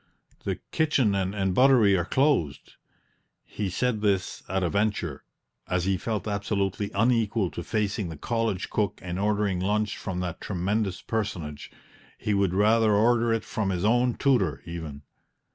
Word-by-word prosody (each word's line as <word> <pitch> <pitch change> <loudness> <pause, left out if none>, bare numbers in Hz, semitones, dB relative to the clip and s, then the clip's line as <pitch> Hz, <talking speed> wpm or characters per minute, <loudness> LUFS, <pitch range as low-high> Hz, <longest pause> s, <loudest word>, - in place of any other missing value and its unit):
The - - 0 0.2
kitchen 140 -9 +2
and 95 0 0
buttery 125 -5 +5
are 85 -2 0
closed" 130 - +1 0.7
(he 105 -2 -4
said 110 +3 -1
this 100 -3 0
at 95 0 0
a 85 - +1
venture, 100 -8 -1 0.4
as 90 -1 0
he 95 0 +2
felt 105 +1 -3
absolutely 100 -1 -1
unequal 110 -3 +2
to 85 - -6
facing 105 -2 -1
the 80 - -7
college 115 -1 -2
cook 105 -3 -1
and 90 0 -4
ordering 100 -2 +1
lunch 105 +2 0
from 90 -2 -4
that 90 -2 -5
tremendous 95 +1 -1
personage; 85 -10 -4 0.5
he 105 - -1
would 100 -2 +1
rather 110 +1 +4
order 115 +2 +3
it 115 -2 0
from 105 -3 -2
his 90 0 -1
own 120 +2 +3
tutor, 105 - +1
even). 80 -4 -7
100 Hz, 150 wpm, -26 LUFS, 90-110 Hz, 0.7 s, buttery